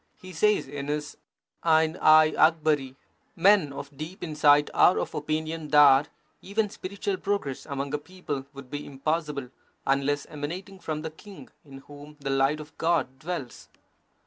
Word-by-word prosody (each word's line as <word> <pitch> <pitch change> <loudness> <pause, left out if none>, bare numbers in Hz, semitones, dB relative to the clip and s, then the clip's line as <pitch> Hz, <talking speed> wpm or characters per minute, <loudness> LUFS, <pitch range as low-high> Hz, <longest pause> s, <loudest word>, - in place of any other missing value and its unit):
He 185 0 -11
says 210 +2 +2
in 140 0 -6
his 150 0 -3 0.5
Ain 160 0 +3
i 155 0 +6
Akbari: 155 -4 +2 0.4
Men 190 -4 +4
of 140 0 -8
deep 160 +8 -8
insight 150 -2 +3
are 180 - +5
of - - -3
opinion 155 +1 -3
that 145 -1 +6 0.3
even 205 +1 -1
spiritual 200 0 -4
progress 195 -10 -3
among 140 -1 -4
a 150 - 0
people 145 -5 -6
would 140 -2 -12
be 145 0 -4
impossible, 145 -1 -3 0.4
unless 140 +1 +1
emanating 180 +7 -7
from 155 -3 -4
the 160 - -5
king, 195 +4 -13
in 135 -2 -12
whom 145 +1 -13
the 140 -1 -3
light 135 +3 +2
of 150 0 -11
God 155 -6 0
dwells. 150 -6 -6
150 Hz, 150 wpm, -27 LUFS, 140-165 Hz, 0.5 s, i